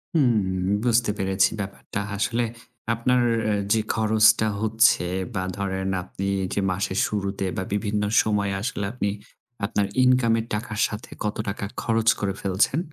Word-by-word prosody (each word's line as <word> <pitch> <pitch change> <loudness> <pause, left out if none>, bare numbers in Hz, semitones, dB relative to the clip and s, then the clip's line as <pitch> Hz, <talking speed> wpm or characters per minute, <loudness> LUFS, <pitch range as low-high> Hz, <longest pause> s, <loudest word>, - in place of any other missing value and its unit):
হুম, 100 - +2 0.2
বুঝতে 120 -2 +3
পেরেছি 95 0 +2
ব্যাপারটা। 100 +1 -5 0.2
আসলে 120 +3 0 0.5
আপনার 125 +2 +2 0.5
যে 110 - +2
খরচটা 110 0 +4
হচ্ছে 110 -4 +3 0.3
বা 95 - 0
ধরেন 95 -1 -2
আপনি 100 +1 -5 0.3
যে - - 0
মাসের 95 +1 -1
শুরুতে 100 -1 -2
বা 95 - -1
বিভিন্ন 105 0 -1 0.2
সময়ে 100 -2 0
আসলে 105 -4 -2
আপনি 100 -5 -1 0.6
আপনার 100 0 0 0.2
ইনকামের 115 -3 +3
টাকার 110 0 -3
সাথে 105 +1 -8
কত 105 - -1
টাকা 100 0 -4 0.2
খরচ 115 -1 0
করে 100 -2 -1
ফেলছেন। 100 - +1
105 Hz, 135 wpm, -24 LUFS, 100-115 Hz, 0.6 s, খরচটা